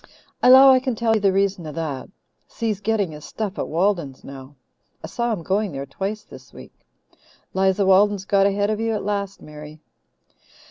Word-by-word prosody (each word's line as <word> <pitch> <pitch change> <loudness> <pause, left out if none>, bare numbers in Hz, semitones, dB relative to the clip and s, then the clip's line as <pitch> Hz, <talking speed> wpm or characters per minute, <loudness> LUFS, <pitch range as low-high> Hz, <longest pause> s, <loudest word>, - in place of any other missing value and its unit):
"I - - +5
'low 265 +1 +9
I 260 - +5
can 255 -2 -3
tell 225 0 +1
you 220 - +1
the 200 -1 +3
reason 195 -3 -1
of 150 - -8
that. 155 -5 -5 0.4
Si's 220 -4 -3
getting 205 -4 -1
his 150 -1 -11
stuff 210 -2 -5
at - - -2
Walden's 170 -6 -1
now. 135 +1 -11 0.5
I - - -5
saw 235 +8 -2
him 195 -7 -3
going 195 0 -1
there 135 0 -5
twice 195 +9 -5
this - - -15
week. - - -13 0.8
'Liza 190 +1 +1
Walden's 195 +1 +3
got 200 0 +3
ahead 205 +1 0
of 215 - -2
you 225 0 -1
at 210 - -4
last, 200 -1 -4
Mary." 150 0 -11
200 Hz, 190 wpm, -22 LUFS, 165-215 Hz, 0.8 s, low